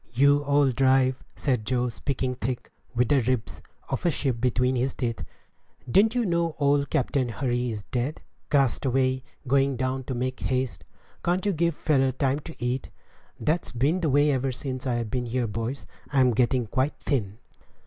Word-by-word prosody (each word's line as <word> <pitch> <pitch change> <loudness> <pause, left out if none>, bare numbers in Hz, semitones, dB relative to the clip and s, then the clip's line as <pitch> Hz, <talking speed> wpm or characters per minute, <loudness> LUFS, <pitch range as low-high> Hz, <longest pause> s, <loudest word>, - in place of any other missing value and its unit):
"You 140 +3 +5
old 140 -2 +3
drive," 130 0 +3
said 125 -6 0
Joe, 125 +2 0
speaking 130 +1 -2
thick, 125 0 -4 0.2
with 120 0 +2
the 140 -2 +4
ribs 125 -1 -1 0.3
of - - -3
a 175 - +3
sheep 130 -6 -1
between 125 +1 +2
his 130 +2 0
teeth, 115 -8 -3 0.6
"didn't 210 - +4
you 245 -2 +2
know 170 -3 0
old 140 -1 +2
Captain 135 -3 0
Hurry 125 0 -1
is 105 -3 -5
dead? 125 +7 -2 0.3
cast 135 -3 +2
away, 130 0 +1 0.3
going 135 +1 +3
down 130 +1 -2
to 130 - -3
Make 130 +1 -2
Haste? 130 -1 -2 0.4
Can't 180 +2 +1
you 200 - +2
give 170 -1 +1
a - - -26
feller 135 -4 +2
time 135 +2 0
to 160 +2 -10
eat? 125 +2 -2 0.5
That's 165 +3 0
been 140 +10 +1
the 160 - +1
way 145 +2 +4
ever 135 -1 0
since 130 +1 -4
I've 120 -3 -1
been 125 -1 -1
here, 120 +1 0
boys. 115 +5 -4 0.3
I'm 130 -3 +4
getting 125 +1 +2
quite 130 +7 0
thin." 110 -8 -1
130 Hz, 180 wpm, -26 LUFS, 125-145 Hz, 0.6 s, You